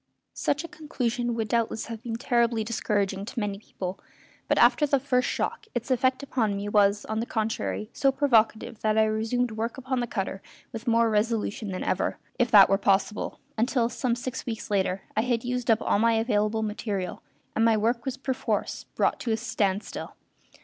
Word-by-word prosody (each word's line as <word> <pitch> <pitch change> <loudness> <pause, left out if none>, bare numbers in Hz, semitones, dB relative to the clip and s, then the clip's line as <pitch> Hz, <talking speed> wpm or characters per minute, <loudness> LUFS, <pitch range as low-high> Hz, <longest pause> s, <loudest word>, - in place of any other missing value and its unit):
Such 290 +2 -1
a - - -6
conclusion 245 -7 -2
would 225 -2 -1
doubtless 230 0 0
have 230 -1 -7
been 230 -1 -4
terribly 235 -1 +1
discouraging 205 -3 -1
to 235 +3 -5
many 205 -2 -2
people, 185 -3 -6 0.5
but - - +2
after 295 - +5
the 275 -1 +3
first 250 -2 +1
shock 435 - -2
its 240 +2 -2
effect 260 +2 +2
upon 225 -7 0
me 200 +1 -4
was, 205 0 +3
on 220 0 -2
the 230 - -2
contrary, 220 0 -2
so 275 - +3
provocative 230 -5 +2
that 215 0 +1
I 220 - +6
resumed 225 +3 0
work 225 +3 -3
upon 260 -1 -2
the 240 - -1
cutter 195 -3 -3 0.3
with 225 +1 -7
more 230 -1 +3
resolution 215 -1 0
than 185 -1 -3
ever, - - 0 0.2
if 245 -1 +3
that 205 -4 +9
were 195 - +2
possible, 200 +1 0 0.2
until, 240 0 +2
some 245 -1 -1
six 250 +1 -5
weeks 225 -3 -5
later, 190 -1 0
I 215 - +3
had 235 -1 0
used 250 -1 -2
up 225 0 +4
all - - +2
my 230 +1 +4
available 220 -1 +1
material, 210 -3 -3 0.3
and 225 - +2
my 225 -1 +4
work 230 +2 +1
was 265 -1 -3
perforce 260 -1 -2
brought - - +1
to 235 - -2
a 220 - +2
standstill. 210 -3 -2
225 Hz, 190 wpm, -27 LUFS, 210-245 Hz, 0.5 s, that